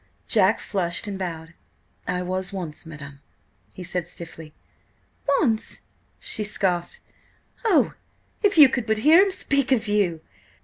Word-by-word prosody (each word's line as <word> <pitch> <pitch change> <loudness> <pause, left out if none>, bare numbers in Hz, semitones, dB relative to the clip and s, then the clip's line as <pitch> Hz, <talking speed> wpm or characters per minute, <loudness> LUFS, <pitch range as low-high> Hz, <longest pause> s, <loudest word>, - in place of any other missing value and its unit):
Jack - - +4
flushed 180 0 -2
and 200 -2 -5
bowed. 165 -3 -5 0.5
"I 180 0 -1
was 185 +1 -3
once–madam," 155 -6 -8 0.5
he 185 - -10
said 180 -1 -3
stiffly. 165 -2 -9 0.9
"Once!" 225 -7 0 0.4
she 215 - -2
scoffed. 180 -4 -1 0.7
"Oh, 405 -7 +3 0.5
if 405 -4 +2
you 295 -3 +11
could 245 -3 -2
but 220 0 +2
hear 325 +4 +8
him 400 - +1
speak 280 -8 0
of 230 -4 +2
you! 195 -6 +1
190 Hz, 130 wpm, -24 LUFS, 170-230 Hz, 0.9 s, you